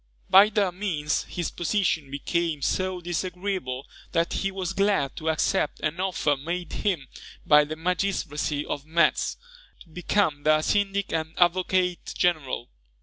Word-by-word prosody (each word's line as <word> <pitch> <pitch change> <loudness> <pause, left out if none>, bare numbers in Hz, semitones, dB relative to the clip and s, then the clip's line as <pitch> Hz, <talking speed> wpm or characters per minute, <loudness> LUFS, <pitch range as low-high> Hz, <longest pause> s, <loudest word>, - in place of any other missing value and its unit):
By 200 +3 +8
their 205 -4 +1
means 170 -6 -1
his 175 -2 -4
position 175 -5 0
became 155 +1 -2
so 185 +2 0
disagreeable 175 -6 -3 0.3
that 165 0 +1
he 195 - 0
was 190 -1 -4
glad 195 -8 +1
to 160 - -2
accept 155 -1 0
an 155 +3 -2
offer 185 -6 +1
made 170 +4 -5
him 175 -10 -1 0.4
by 150 0 +6
the 155 +1 -5
magistracy 160 -4 -1
of 140 - -4
Metz, 165 +2 +1 0.4
to 170 - -16
become 170 -2 0
their 155 +1 +3
syndic 200 0 0
and 160 0 -2
advocate 180 0 +1
general. 155 -8 0
175 Hz, 140 wpm, -26 LUFS, 150-185 Hz, 0.4 s, By